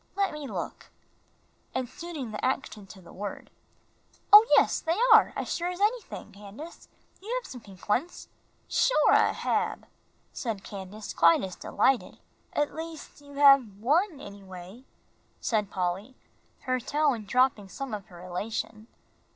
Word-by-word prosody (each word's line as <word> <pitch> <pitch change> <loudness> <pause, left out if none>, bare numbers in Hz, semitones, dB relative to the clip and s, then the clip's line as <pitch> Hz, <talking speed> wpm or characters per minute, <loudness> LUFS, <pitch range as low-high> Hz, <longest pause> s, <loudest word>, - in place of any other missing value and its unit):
"Let 395 -3 0
me 300 -2 -6
look," - - -6 0.9
and 260 -1 -1
suiting 300 -4 -7
the 210 - -6
action 235 -6 -2
to 190 0 -13
the 170 - -14
word. 200 +2 -7 0.8
"Oh, 425 +2 +11
yes, - - +3
they 330 +2 0 0.2
are, 440 - +7
as - - -3
sure 345 - -2
as 360 0 -4
anything, 420 - -1
Candace; 210 - -11 0.3
you 425 +4 -7
have - - -13
some 250 - -9
pink 195 -3 -15
ones." 265 +12 -1 0.4
"Shore, - - +3
I - - +5
hab," - - -1 0.5
said 220 -6 -4
Candace, 205 +1 -8
quite 165 +2 +5
as 185 -2 -5
delighted. 265 -2 0 0.3
"At 295 0 -1
least 320 -2 -8
you 285 0 -14
have 275 -8 +6
one, 300 - +1
anyway," 195 +2 -11 0.5
said 210 -4 0
Polly, 190 +7 -3 0.5
her 255 -1 -1
tone 280 -3 0
dropping 235 -3 +2
some 270 +3 -6
of 205 -2 -5
her 175 -1 -13
elation. 215 +4 -5
245 Hz, 145 wpm, -28 LUFS, 200-300 Hz, 0.9 s, Oh